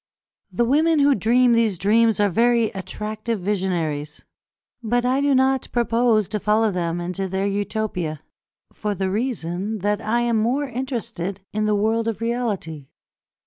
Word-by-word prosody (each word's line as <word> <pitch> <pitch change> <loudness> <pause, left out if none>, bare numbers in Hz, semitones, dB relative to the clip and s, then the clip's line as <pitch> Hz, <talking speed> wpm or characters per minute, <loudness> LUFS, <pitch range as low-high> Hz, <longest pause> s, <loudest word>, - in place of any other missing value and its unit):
The 240 - +1
women 310 +6 +3
who 285 0 +5
dream 245 +3 +3
these 225 -5 +2
dreams 220 +3 +3
are 205 - +4
very 230 +3 +2
attractive 210 +4 -4
visionaries, 170 -7 -2 0.6
but 240 +2 0
I 260 +2 +2
do 285 -1 +3
not 265 0 +2
propose 230 -3 +2
to 210 - -2
follow 215 +1 +2
them 175 -2 -2
into 180 +2 -3
their 190 +1 -1
Utopia, 200 -6 -2 0.5
for 210 -1 -3
the 190 -1 -2
reason 210 -3 -2
that 205 +1 0
I 235 +3 0
am 235 -1 +1
more 245 +6 +1
interested 230 -7 -4
in 215 0 0
the 210 0 +2
world 220 +2 +1
of 220 -3 -2
reality. 215 - -3
215 Hz, 150 wpm, -22 LUFS, 190-235 Hz, 0.6 s, who